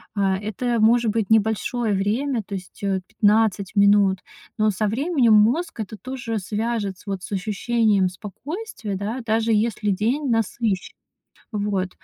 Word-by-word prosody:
А, 195 -2 +1
это 220 +4 -2
может 230 0 +4
быть 220 -3 -1
небольшое 220 +1 +1
время, 225 +6 0
то 200 - -6
есть, 185 +1 -9
э, 195 -1 0
15 210 -2 +1
минут, 200 -2 +4 0.4
но 215 0 +3
со 210 +2 -1
временем 255 - +2
мозг 235 +12 +3
это 210 +1 -7
тоже 240 0 -4
свяжет 210 -1 -2
с, - - -18
вот, 195 -2 -4
с - - -9
ощущением 210 0 +1
спокойствия, 215 - -6
да, 210 +6 -3
даже 225 0 +1
если 215 -1 +1
день 235 +9 0
насыщен. 225 -3 -1 0.6
Вот, 200 -3 -1
215 Hz, 145 wpm, -23 LUFS, 200-230 Hz, 0.6 s, может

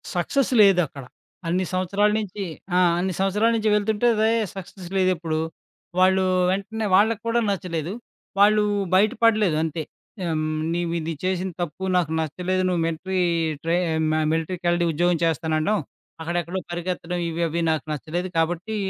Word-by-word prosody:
Success 255 +10 0
లేదక్కడ. 180 -9 +3 0.4
అన్ని 185 +2 0
సంవత్సరాల 195 +3 +2
నించి 205 -1 -5 0.3
ఆ! - - +5 0.2
అన్ని 185 +1 -1
సంవత్సరాల 205 +4 +2
నించి 220 -1 +1
వెళ్తుంటే 215 +3 +1
రే 220 - +4 0.3
సక్సెస్ 190 -1 -9
లేదెప్పుడు. 175 -4 +1 0.6
వాళ్ళు 190 0 +4 0.3
వెంటనే 205 +3 -2
వాళ్ళక్కూడా 225 +3 +2
నచ్చలేదు. 175 -2 -3 0.5
వాళ్ళు 210 +1 +5 0.3
బయట 205 +4 +5
పడలేదు 215 -8 +4
అంతే. 160 0 -3 0.4
హ్మ్. 160 -3 -1 0.3
నీవు 170 -1 -1
ఇది 165 +1 -3
చేసిన 185 0 -1
తప్పు, 175 +3 -4
నాకు 165 -3 0
నచ్చలేదు 185 +4 -1
నువ్వు 180 -2 0
మిలటరీ 185 +3 -2 0.4
ట్రై 165 +1 +1 0.3
మ - - +1 0.2
మిలటరీ 165 +3 -1
కెలడి 175 0 +2
ఉద్యోగం 175 +2 +1
చేస్తాననడం. 160 +4 0 0.4
అక్కడ 170 +2 -3
ఎక్కడో 175 +3 -4
పరికెత్తడం 175 0 -3
ఇవి 165 +1 -3
అవి 170 +2 -2
నాకు 155 -2 -2
నచ్చలేదు. 170 +5 -3
కాబట్టి 175 +6 -1
180 Hz, 140 wpm, -23 LUFS, 165-200 Hz, 0.6 s, ఆ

